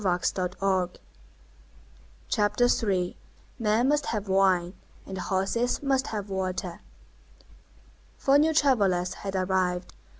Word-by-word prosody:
CHAPTER 210 +2 +2 0.2
III—MEN 210 +4 -1
MUST 295 +1 +2
HAVE 210 -2 -2
WINE, 190 -2 +3 0.3
AND 190 - -7
HORSES 195 +9 -1
MUST 270 -2 +1
HAVE 210 -2 -4
WATER 185 -2 -3 1.4
Four 280 +1 +4
new 315 +2 +4
travellers 200 - +2
had 195 -1 -6
arrived. 185 -1 0
195 Hz, 90 wpm, -27 LUFS, 185-240 Hz, 1.4 s, Four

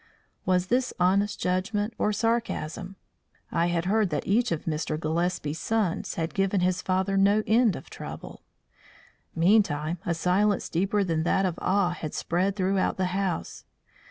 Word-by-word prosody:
Was 180 -1 +2
this 250 +5 +1
honest 200 +3 +2
judgment 205 +4 -1
or 210 - +2
sarcasm? 205 -5 -2 0.6
I 170 - +1
had 175 0 -1
heard 210 +1 +2
that 150 - -2
each 230 +3 +2
of 165 - -2
Mr. 155 -1 -2
Gillespie's 160 -1 -1
sons 220 -6 -1
had 165 0 -3
given 195 -1 +1
his 180 0 +1
father 190 +1 0
no 200 +2 +4
end 225 -4 +3
of - - -9
trouble. - - -8 0.9
Meantime 170 -3 +2
a 170 - -1
silence 190 +4 +1
deeper 195 +4 +1
than 165 -4 0
that 190 +4 +2
of 180 -2 -2
awe 190 -1 +2
had 160 -3 -6
spread 185 +3 0
throughout 190 -1 0
the 185 -1 0
house. 190 -3 -2
185 Hz, 155 wpm, -27 LUFS, 170-205 Hz, 0.9 s, no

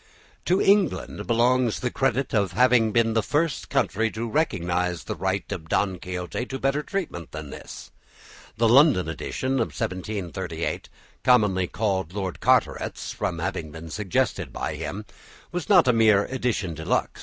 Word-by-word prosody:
To 185 +2 +3
England 200 0 +2
belongs 120 0 +2
the 125 - -2
credit 135 0 0
of 100 -4 +1
having 120 0 +4
been 115 +1 +2
the 115 - +2
first 150 +5 -1
country 110 +3 +1
to 115 +2 -4
recognise 90 - 0
the - - -4
right 95 +1 -2
of 80 -5 -5
"Don 95 -3 0
Quixote" 90 +7 -4
to 135 - -4
better 135 +2 0
treatment 155 - -4
than 75 -2 -7
this. - - -10 0.7
The 115 +1 +3
London 125 - +5
edition 130 - -2
of 115 - -2
1738, 95 -3 -3 0.3
commonly 105 -8 +3
called 95 -5 -1
Lord 95 -3 -3
Carteret's - - +1
from 85 - -2
having 85 -2 -3
been 80 +1 -9
suggested 100 -4 -1
by - - -3
him, 105 +2 -5 0.5
was 175 -2 -4
not 180 -8 +6
a 125 - +5
mere 110 -3 +4
edition 120 -9 -2
de 80 0 -7
luxe. - - -1
110 Hz, 155 wpm, -25 LUFS, 90-125 Hz, 0.7 s, not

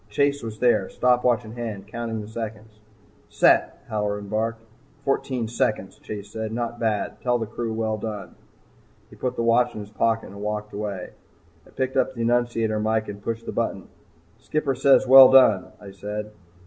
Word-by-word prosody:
Chase 140 +6 +1
was 110 -1 -6
there, 110 -5 +2
stopwatch 125 -1 +2
in 110 - -9
hand, 110 -4 -6
counting 115 0 -4
the 105 - -8
seconds. 110 -1 -7 0.5
"Set!" - - +3
Halloran 105 -1 -3
barked. 115 +1 -2 0.4
"Fourteen 130 -4 -1
seconds," 110 -4 -2
Chase 105 -1 -8
said. 110 0 -4
"Not 120 +1 -3
bad. 110 -3 -2
Tell 125 -1 +1
the 115 - -3
crew 115 +1 -4
well 110 -1 -1
done." 105 -2 -6 0.8
He - - -13
put 125 -1 -3
the 115 - -1
watch 120 +1 +3
in - - -5
his 105 0 -11
pocket 115 +1 0
and 100 +1 -10
walked 105 0 -4
away. 100 -3 -5 0.6
I - - -18
picked 130 0 -2
up 130 - +1
the 115 - -2
annunciator 115 -2 +1
mike 110 0 0
and 100 0 -8
pushed 115 +2 -4
the - - -4
button. 100 -5 -3 0.5
"Skipper 150 -3 -1
says 135 +1 +4
well 130 0 +10
done," 125 -8 +6
I 100 -1 -11
said. 105 +2 -6
110 Hz, 175 wpm, -24 LUFS, 105-120 Hz, 0.8 s, well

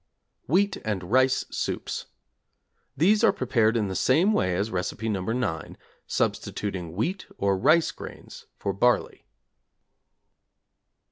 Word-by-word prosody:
=Wheat 195 +7 +2
and 95 -3 -4
Rice 130 +1 +3
Soups= - - -3 0.9
These 205 - +4
are - - +6
prepared 115 -3 +1
in 105 -3 0
the 95 - -3
same 165 - +3
way 95 - +1
as 100 +5 -1
Recipe 100 +4 -3
No. 100 -4 -1
9, 105 - -3 0.3
substituting 90 -5 -2
wheat 180 - -2
or 100 -1 +2
rice 155 - +3
grains - - -11
for 100 - -2
barley. 120 +5 +1
110 Hz, 120 wpm, -26 LUFS, 95-140 Hz, 0.9 s, are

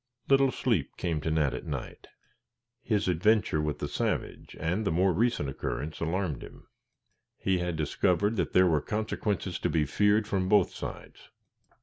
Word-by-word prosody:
Little 135 0 +5
sleep 110 - -1
came 80 -4 -1
to 80 - -2
Nat 75 -4 +1
at 65 - -6
night. - - -6 0.7
His 105 -4 0
adventure 90 -2 +2
with 75 -1 -2
the - - -3
savage, - - -3
and 85 +7 -1
the 95 - 0
more 90 +3 +3
recent 115 - +1
occurrence 75 +3 -4
alarmed 85 -3 -2
him. - - -12 0.7
He 95 -2 0
had 90 -1 -2
discovered 95 +7 +1
that - - -1
there 95 - +6
were 80 -4 +2
consequences 105 -3 -2
to - - 0
be 80 -2 +1
feared 105 +7 +2
from 95 -3 0
both 100 -3 +4
sides. - - -8
90 Hz, 160 wpm, -29 LUFS, 80-105 Hz, 0.7 s, there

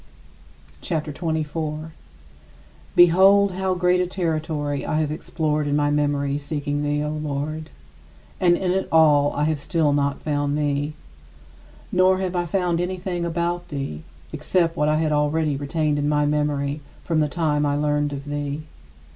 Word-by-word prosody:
CHAPTER 155 -3 -3
XXIV 160 0 -1
35. 155 +1 -4 1.0
Behold 190 +3 +6
how 190 0 -1
great 180 0 +2
a 180 - 0
territory 155 -5 -2
I 155 - -1
have 150 -2 0
explored 155 -1 -1
in 145 - +1
my 145 0 +2
memory 145 -1 0
seeking 145 0 -3
thee, 145 0 0
O 150 - -2
Lord! 155 +1 -4 0.7
And 175 -1 +4
in 185 -1 0
it 190 +1 -1
all 150 -3 +5
I 145 - -1
have 155 -1 0
still 155 -2 +1
not 140 -1 0
found 145 -1 0
thee. 145 0 -1 1.0
Nor 185 +1 +4
have 185 -1 -2
I 175 -1 0
found 175 -1 0
anything 180 -1 -3
about 170 +1 -2
thee, 135 - -5 0.3
except 170 -3 0
what 150 -2 +1
I 155 - +2
had 155 -1 0
already 150 0 +1
retained 145 +1 -1
in 145 0 0
my 150 0 +2
memory 145 -1 -1 0.2
from 165 -2 0
the 150 -1 +1
time 150 -2 0
I 145 -1 +1
learned 145 0 0
of 140 0 -6
thee. 145 0 -4
150 Hz, 160 wpm, -23 LUFS, 145-170 Hz, 1.0 s, Behold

